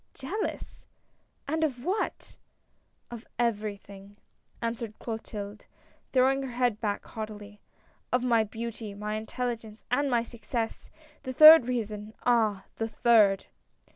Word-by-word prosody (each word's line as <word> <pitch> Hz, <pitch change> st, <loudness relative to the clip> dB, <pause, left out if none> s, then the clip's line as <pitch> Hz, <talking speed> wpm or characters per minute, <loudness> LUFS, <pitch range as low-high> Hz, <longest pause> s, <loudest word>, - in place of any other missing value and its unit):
" -, -, -44 dB
Jealous! 365 Hz, +11 st, -5 dB, 0.6 s
and 320 Hz, +3 st, 0 dB
of 260 Hz, -5 st, -2 dB
what? 405 Hz, +4 st, -3 dB, 0.2 s
" -, -, -43 dB
" -, -, -34 dB
Of 235 Hz, 0 st, -9 dB
everything," 205 Hz, -3 st, -3 dB, 0.4 s
answered 230 Hz, -1 st, -4 dB
Clotilde, 210 Hz, -2 st, -6 dB, 0.5 s
throwing 265 Hz, +1 st, +3 dB
her 265 Hz, -2 st, -5 dB
head 245 Hz, -3 st, 0 dB
back 205 Hz, -2 st, -2 dB
haughtily; 210 Hz, -1 st, -8 dB, 0.2 s
" -, -, -37 dB
of 250 Hz, 0 st, +2 dB
my 230 Hz, -3 st, +3 dB
beauty, 220 Hz, -1 st, -6 dB
my 210 Hz, +1 st, -4 dB
intelligence 220 Hz, 0 st, -4 dB
and 280 Hz, +3 st, +2 dB
my 240 Hz, -2 st, +2 dB
success. 230 Hz, 0 st, -4 dB, 0.3 s
The 260 Hz, -2 st, -5 dB
third 310 Hz, -2 st, +10 dB
reason, 215 Hz, -3 st, -3 dB
ah! 215 Hz, -5 st, +2 dB
the 225 Hz, -, -1 dB
third 220 Hz, -4 st, +4 dB
230 Hz, 135 wpm, -28 LUFS, 210-250 Hz, 0.6 s, third